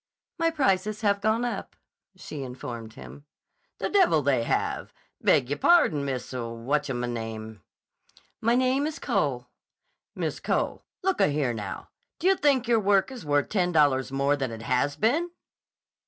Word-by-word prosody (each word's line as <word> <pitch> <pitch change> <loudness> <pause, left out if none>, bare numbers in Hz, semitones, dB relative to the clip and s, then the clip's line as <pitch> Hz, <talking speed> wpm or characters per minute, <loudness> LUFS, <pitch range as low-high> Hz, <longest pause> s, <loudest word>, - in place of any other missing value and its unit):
"My 330 0 +3
prices 215 - 0
have 200 -2 +2
gone 220 +3 +1
up," 225 -5 -4 0.4
she 155 -5 -8
informed 120 -3 -7
him. 140 +2 -12 0.5
"The - - -2
devil 365 - +3
they 130 -4 +2
have! - - -2 0.3
Beg 130 0 +3
y' - - +1
pardon, 155 - +4
Miss 130 -3 -4
Watchemame—" 115 -3 -3 0.8
"My 230 +2 +3
name 260 +3 +2
is 315 0 -5
Cole." 140 - -1 0.7
"Miss - - -3
Cole. - - -1 0.2
Look 380 0 +1
a - - +5
here, 145 -4 0
now; 105 -4 -6 0.3
d' - - -15
you 385 +1 +5
think 275 -7 +2
your 235 -2 +4
work 200 +3 +2
is 255 -3 -8
worth 145 0 +2
ten 180 -4 +1
dollars 140 -5 +3
more 140 +1 +2
than 135 -4 -3
it 115 0 -7
has 135 +3 +1
been?" 285 - +1
145 Hz, 155 wpm, -26 LUFS, -, 0.8 s, a